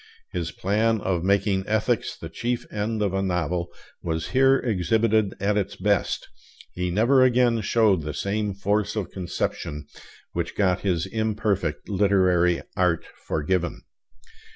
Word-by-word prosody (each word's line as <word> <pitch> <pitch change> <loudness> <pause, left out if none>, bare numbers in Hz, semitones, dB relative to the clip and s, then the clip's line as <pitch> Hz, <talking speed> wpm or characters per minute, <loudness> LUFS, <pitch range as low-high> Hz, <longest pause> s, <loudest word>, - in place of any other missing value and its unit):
His 85 -2 -3
plan 110 +5 +1
of 90 -4 -1
making 100 0 +2
ethics 110 +2 0
the 80 - -7
chief 120 +9 -3
end 105 +1 -1
of 100 -2 0
a 95 - 0
novel 90 -2 -1 0.3
was 80 -1 -3
here 135 +1 +4
exhibited 110 -1 +1
at 100 +1 +1
its 100 +1 -3
best; 100 0 0 0.5
he 90 0 -2
never 115 +9 +4
again 125 -2 +4
showed 105 -6 +3
the 75 -1 -5
same 100 +3 -2
force 105 +2 0
of 105 -4 -3
conception 75 -5 -4 0.5
which 85 -1 -3
got 95 -2 +2
his 90 -3 0
imperfect 105 -7 -1
literary 95 -3 +2
art 90 -3 +1 0.2
forgiven. 85 +3 -1
100 Hz, 135 wpm, -25 LUFS, 90-110 Hz, 0.5 s, here